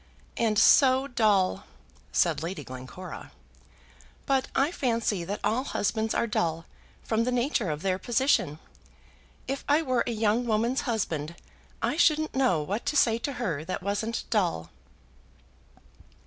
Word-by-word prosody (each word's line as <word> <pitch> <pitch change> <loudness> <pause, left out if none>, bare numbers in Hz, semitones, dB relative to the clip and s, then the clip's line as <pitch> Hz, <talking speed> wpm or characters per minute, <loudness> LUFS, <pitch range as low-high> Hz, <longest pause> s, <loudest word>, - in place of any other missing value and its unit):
"And 220 -2 +1
so 265 +3 +5
dull!" 210 -7 +2 0.5
said - - +2
Lady 165 -2 -5
Glencora. 130 +8 -9 0.9
"But 270 -1 +1
I 280 +4 +2
fancy 230 - -1
that 200 +4 -4
all 225 +5 +1
husbands 220 -3 -1
are - - +2
dull 170 -8 -1 0.4
from 225 0 0
the 250 - -1
nature 245 - 0
of 150 +2 -4
their 190 -1 0
position. 240 - +1 0.9
If 275 +1 -3
I 300 +3 +4
were 255 -4 +1
a - - 0
young 225 +2 +1
woman's 230 +4 +1
husband, 170 -8 -2 0.5
I 300 - 0
shouldn't 310 -2 +3
know 250 - +2
what 200 +9 -3
to 295 - +1
say 230 -4 +3
to 275 +4 -3
her 185 - -3
that 180 - -4
wasn't 205 +3 -2
dull." 175 - 0
220 Hz, 140 wpm, -27 LUFS, 185-255 Hz, 0.9 s, so